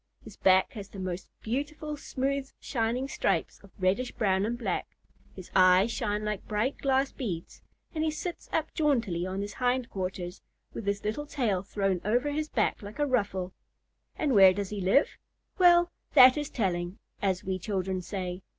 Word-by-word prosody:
His 215 -3 -12
back 190 0 +4
has 205 -4 -8
the 200 - -11
most 185 -1 -4
beautiful 295 +5 -3
smooth 275 -1 -2
shining 240 +2 -1
stripes - - -1
of 200 - -15
reddish 195 +7 +1
brown 195 -1 +1
and 240 +1 -2
black, 240 - -2 0.5
his 185 -2 -10
eyes 185 +3 +6
shine 210 -1 -2
like 210 -2 -3
bright 215 +6 -1
glass 270 0 +1
beads, 180 -10 -5 0.3
and 315 -1 -1
he 315 - +2
sits 340 +3 -5
up 315 0 -1
jauntily 230 - +1
on 190 +1 -3
his 205 0 -5
hind 250 0 +1
quarters, 185 -1 -4 0.3
with 215 - -6
his 200 0 -1
little 255 +8 -2
tail 220 -11 0
thrown 195 -2 -1
over 245 +8 +1
his 305 +1 -2
back - - 0
like 205 +1 -9
a 295 - +2
ruffle. 200 -8 -1 0.6
And 290 -4 0
where 190 -3 +8
does 200 0 -3
he 205 -2 -3
live? 195 +11 +2 0.4
Well, 350 -1 +6 0.2
"that 255 -2 +9
is 295 -1 -3
telling," 180 -4 -2 0.2
as 190 -2 0
we 190 0 -2
children 190 -1 -2
say. 180 -1 -4
210 Hz, 175 wpm, -29 LUFS, 190-270 Hz, 0.6 s, that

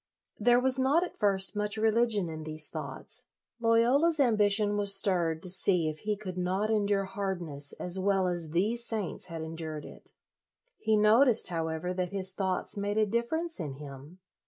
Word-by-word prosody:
' - - -34
There 245 0 +6
was 260 +1 +2
not, 280 +6 +3
at 360 - -6
first, 195 -2 0
much 210 +1 -2
religion 220 -3 +2
in 160 -1 -6
these 155 0 -1
thoughts. 155 - -7 0.3
Loyola's 245 +8 +3
ambition 210 -4 +3
was 200 -1 +5
stirred 175 -5 0
to 185 - -1
see 180 -3 +2
if 155 0 -7
he 210 0 -2
could 185 -3 -6
not 190 +4 -1
endure 205 -2 +1
hard 190 -1 -3
ness 145 -4 -4
as 180 +1 -2
well 190 -1 +1
as 175 -3 -2
these 210 +9 +1
saints 220 -6 -4
had 165 -2 -6
endured 160 -1 -6
it. - - -12 0.7
He 220 -1 +2
noticed, 225 +3 +4
however, 165 +1 -3
that 180 -1 -2
his 190 -1 -1
thoughts 190 -2 -2
made 205 +1 -2
a 215 - +4
difference 235 +9 -2
in 150 -5 -4
him. 140 +3 -11
195 Hz, 180 wpm, -29 LUFS, 170-220 Hz, 0.7 s, There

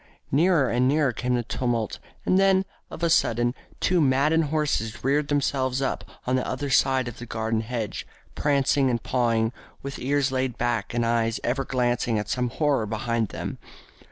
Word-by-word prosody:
Nearer 160 -1 +4
and 125 +1 +2
nearer 140 -2 +2
came 125 +2 -1
the 120 - 0
tumult, 120 -2 -2 0.3
and 185 - +3
then, 195 -1 +4 0.2
of 170 - -8
a 170 - +3
sudden, 120 -3 +2 0.3
two 180 -1 +2
maddened 150 +4 +3
horses 140 -7 -1
reared 140 +3 +2
themselves 135 -2 0
up 135 - -1 0.2
on 125 - +1
the 130 - 0
other 145 -1 -3
side 130 -1 +3
of 120 - -7
the 120 - -8
garden 110 0 -1
hedge, 115 -2 -4 0.3
prancing 140 -1 +2
and 120 -3 -1
pawing, 115 -2 +1 0.3
with 140 0 -6
ears 140 +1 +1
laid 130 -2 -1
back 120 -3 -1
and 120 -1 +1
eyes 115 -1 +1
ever 135 +3 0
glancing 120 -3 0
at 105 -1 -3
some 125 -1 0
horror 140 -4 +1
behind 115 +1 -1
them. - - -6
125 Hz, 175 wpm, -25 LUFS, 115-140 Hz, 0.3 s, Nearer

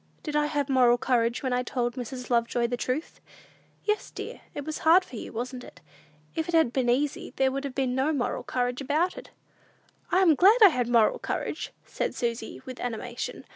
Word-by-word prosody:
"Did 300 -2 -4
I 300 0 +3
have 290 -2 -1
moral 250 -3 +4
courage 240 +1 +1
when 260 -1 0
I 250 - +1
told 240 -1 -2
Mrs. 250 0 -6
Lovejoy 235 0 +2
the 240 +1 -1
truth?" 255 +5 -3 0.7
"Yes, 425 0 0
dear. - - -8
It 285 - -5
was 310 - -4
hard 345 +4 +5
for - - -11
you, - - -7
wasn't 250 +2 -5
it? - - -13 0.5
If 320 +1 -3
it 340 - 0
had 320 -7 +4
been 255 -2 +1
easy, 275 +4 0
there 265 0 +2
would 275 +1 -3
have 270 -2 -5
been 260 -2 0
no 265 +4 +1
moral 270 -5 -1
courage 250 +1 -2
about 305 +7 0
it." - - -10 0.8
"I 375 +1 +4
am 335 -4 +6
glad 390 - +6
I 405 - +10
had 250 -7 -1
moral 235 -2 +3
courage!" - - -3
said - - -3
Susy 235 +1 -3
with 255 -2 -8
animation. 245 +1 -5
255 Hz, 205 wpm, -27 LUFS, 245-300 Hz, 0.8 s, I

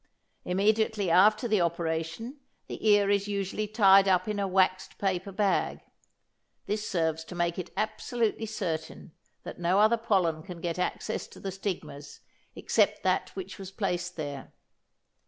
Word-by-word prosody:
Immediately 210 0 +1
after 215 +6 +5
the 215 -4 +2
operation 170 - -2 0.3
the 220 - -2
ear 205 -1 +5
is 200 0 +1
usually 200 +1 -2
tied 195 -2 +6
up 185 0 +2
in 210 -1 -2
a 200 - 0
waxed 185 0 +1
paper 190 0 -1
bag. 200 0 0 0.8
This 210 +1 -2
serves 160 -3 0
to 180 - -9
make 175 0 -1
it 180 - -5
absolutely 225 +1 -1
certain 165 -7 -4 0.3
that - - -8
no 175 +2 +2
other 220 +3 +5
pollen 185 -8 +1
can 180 0 -9
get 170 +1 -3
access 180 - -2
to - - -14
the 195 - -4
stigmas 180 -7 -6 0.3
except - - +1
that - - +1
which 375 - -7
was 190 -1 -7
placed 180 -3 -3
there. 145 -4 -6
190 Hz, 150 wpm, -28 LUFS, 175-210 Hz, 0.8 s, tied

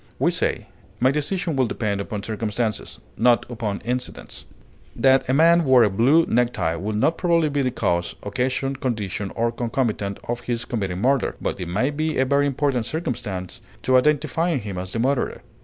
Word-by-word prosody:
We - - +2
say, - - -1 0.3
"My 130 +2 +4
decision 160 +3 -1
will 130 -2 +2
depend 105 -3 -2
upon 100 0 -5
circumstances" 110 0 -3 0.2
not 120 0 +4
"upon 110 -4 -3
incidents." 125 +1 -5 0.5
That 135 -1 +3
a - - +3
man 170 +3 +5
wore 130 -4 +6
a 105 - +2
blue 135 +11 +4
necktie 120 -9 +1
would 105 +6 -3
not 155 +10 +1
probably 170 -3 +2
be 145 0 0
the 130 - +1
cause, 85 -8 -1
occasion, 130 +6 -1
condition, 105 -6 -3
or 115 0 +1
concomitant 115 -4 -2
of 120 0 -3
his 120 -1 -2
committing 95 -6 -3
murder; 135 +1 +1
but - - -3
it 90 - -4
might 130 +12 -1
be 155 0 -1
a 130 - +3
very 140 +2 +2
important 135 -4 0
circumstance 105 - -4 0.3
in 130 - +3
identifying 150 +3 +2
him 100 -3 -5
as 90 0 -5
the - - -3
murderer. 130 +3 0
125 Hz, 175 wpm, -23 LUFS, 105-140 Hz, 0.5 s, wore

